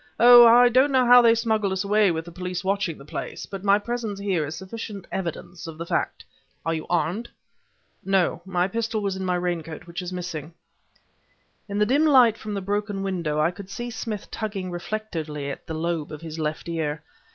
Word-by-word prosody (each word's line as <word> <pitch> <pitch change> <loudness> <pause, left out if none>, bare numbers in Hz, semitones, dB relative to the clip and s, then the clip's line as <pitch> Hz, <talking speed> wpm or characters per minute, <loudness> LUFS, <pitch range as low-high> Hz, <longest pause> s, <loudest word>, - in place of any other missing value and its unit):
Oh! 240 0 +10
I 240 +2 +7
don't 260 +4 +4
know 260 -2 +4
how 245 0 +8
they 230 -1 +5
smuggled 220 -3 0
us 190 +1 -1
away 205 0 +3
with 165 -1 -2
the 170 - -10
police 180 0 -5
watching 195 -4 -1
the 140 - -13
place; - - -6
but 195 -2 -8
my 200 0 +5
presence 225 -1 -4
here 195 -5 0
is 155 - -6
sufficient 200 0 -7
evidence 175 -2 -5
of 160 -1 -8
the 170 - -5
fact. - - -2 0.4
Are 165 - +1
you 160 -1 -4
armed?" 175 +7 -1 0.7
"No; 190 -3 +1
my 180 -1 0
pistol 225 +1 -2
was 195 -1 -1
in 190 - -4
my 180 -1 0
raincoat, 170 -3 -3
which 175 +1 -6
is 180 0 -6
missing." 170 -3 -6 1.1
In 200 - -3
the 210 - +3
dim 280 +7 +3
light 250 -6 +6
from 215 -2 -6
the 200 - -2
broken 205 0 -2
window, 170 -6 -2
I 155 +3 +3
could 190 +1 -11
see 240 +4 -5
Smith 225 -2 -5
tugging 200 -4 -4
reflectively 165 -7 -4
at - - -9
the 160 - -4
lobe 165 -1 -2
of 155 0 -8
his 160 -1 -7
left 155 +1 -3
ear. 160 -2 -3
190 Hz, 205 wpm, -24 LUFS, 170-215 Hz, 1.1 s, Oh